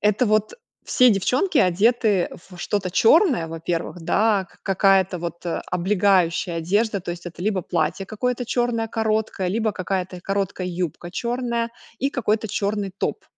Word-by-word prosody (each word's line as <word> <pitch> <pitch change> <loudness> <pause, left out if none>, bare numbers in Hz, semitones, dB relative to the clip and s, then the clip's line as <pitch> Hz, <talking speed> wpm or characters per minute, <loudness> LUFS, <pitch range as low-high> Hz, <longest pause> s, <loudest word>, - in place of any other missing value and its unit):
Это 210 +4 +2
вот: 215 0 +1 0.3
все 250 -1 +5
девчонки 255 - +1
одеты 205 +1 +3 0.2
во 180 - -12
что-то 195 -1 -2
черное, 245 - +4
во 165 0 -7
первых, 170 +1 -3
да. 205 +2 +2
Ка - - -23
какая-то 195 -2 +3
вот, 170 +1 -6
э, 170 - -2
облегающая 180 -2 +2
одежда, 200 +5 0
то 175 - -5
есть 175 0 -10
это 175 - -9
либо 195 -3 0
платье 190 +2 -1
какое-то 250 +3 -2
черное 240 -2 0
короткое, 220 -4 -1
либо 220 +2 0
какая-то 185 -1 -3
короткая 195 -1 -2
юбка 175 -1 -4
черная 235 +1 -2 0.3
и 275 +3 0
какой-то 220 -4 0
черный 200 -1 -2
топ. - - -3
200 Hz, 155 wpm, -23 LUFS, 180-225 Hz, 0.3 s, все